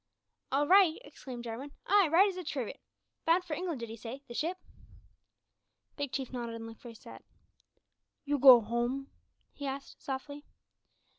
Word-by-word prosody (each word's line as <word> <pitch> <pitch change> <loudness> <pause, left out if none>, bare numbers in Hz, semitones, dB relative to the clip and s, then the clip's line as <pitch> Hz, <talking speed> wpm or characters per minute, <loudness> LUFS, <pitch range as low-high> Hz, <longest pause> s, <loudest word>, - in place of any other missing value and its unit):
"All 280 +2 +2
right!" 370 -3 +6
exclaimed 260 -4 -9
Jarwin, 245 +5 -6
"aye, 400 -2 +5
right 370 +5 +6
as 385 - -3
a 365 - -5
trivet. 280 -4 -4 0.5
Bound 340 +3 +4
for 345 -3 -5
England, 335 -6 -3
did 230 -1 -5
'ee - - -6
say 240 +5 -8
the 240 - -8
ship?" 335 +8 -2 1.4
Big 285 -3 -3
Chief 265 -1 -4
nodded 235 -2 -4
and 225 0 -7
looked 225 0 -11
very 235 -2 -10
sad. - - -12 1.0
"You 290 0 0
go 255 -3 +10
home?" 240 +5 -2 0.4
he 285 - -6
asked, 275 +1 -7
softly. 285 +2 -5
275 Hz, 160 wpm, -31 LUFS, 240-315 Hz, 1.4 s, go